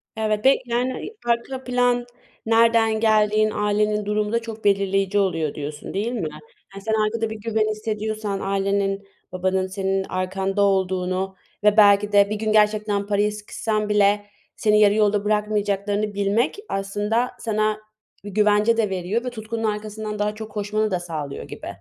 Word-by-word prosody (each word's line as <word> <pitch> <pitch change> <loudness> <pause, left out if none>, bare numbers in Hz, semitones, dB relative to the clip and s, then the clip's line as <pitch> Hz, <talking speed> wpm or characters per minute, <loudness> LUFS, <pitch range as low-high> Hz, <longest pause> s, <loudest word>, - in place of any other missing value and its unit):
Evet 215 0 -1
be 270 - +6
yani, 245 +2 -1
iii, 440 - -8
"arka 240 +3 -1
plan, 245 -1 +1 0.4
nereden 225 -1 +3
geldiğin, 215 -1 +3
ailenin 210 0 0
durumu 210 0 0
da 235 - +2
çok 225 -1 -8
belirleyici 195 0 +2
oluyor." 165 -6 0
diyorsun, 150 0 -6
değil 210 +5 -1
mi? 210 -11 -2 0.4
Hani, 195 0 -9
sen 220 +1 -1
arkada 220 +1 0
bir 220 - -5
güven 220 -1 0
hissediyorsan, 215 -1 -3
ailenin, 195 0 -1 0.2
babanın 185 +1 0
senin 190 0 -1
arkanda 190 +2 -1
olduğunu 190 -1 0 0.3
ve 210 +1 +4
belki 205 0 +6
de 200 0 +5
bir 215 - -1
gün 215 0 -1
gerçekten 210 -1 +2
paraya 205 0 +1
sıkışsan 210 0 -3
bile 205 0 +3 0.3
seni 210 -1 +3
yarı 205 -1 +6
yolda 210 -1 +2
bırakmayacaklarını 210 0 0
bilmek 200 - 0
aslında 205 +5 -1
sana 215 -1 0 0.4
bir 205 - -7
güvence 210 +2 +3
de 215 -3 +1
veriyor 190 +5 -2
ve - - -1
tutkunun 225 -1 -5
arkasından 210 0 -3
daha 210 0 0
çok 220 0 -8
koşmanı 210 0 -1
da 180 - 0
sağlıyor 155 -5 -5
gibi. - - -9
210 Hz, 155 wpm, -23 LUFS, 200-220 Hz, 0.4 s, be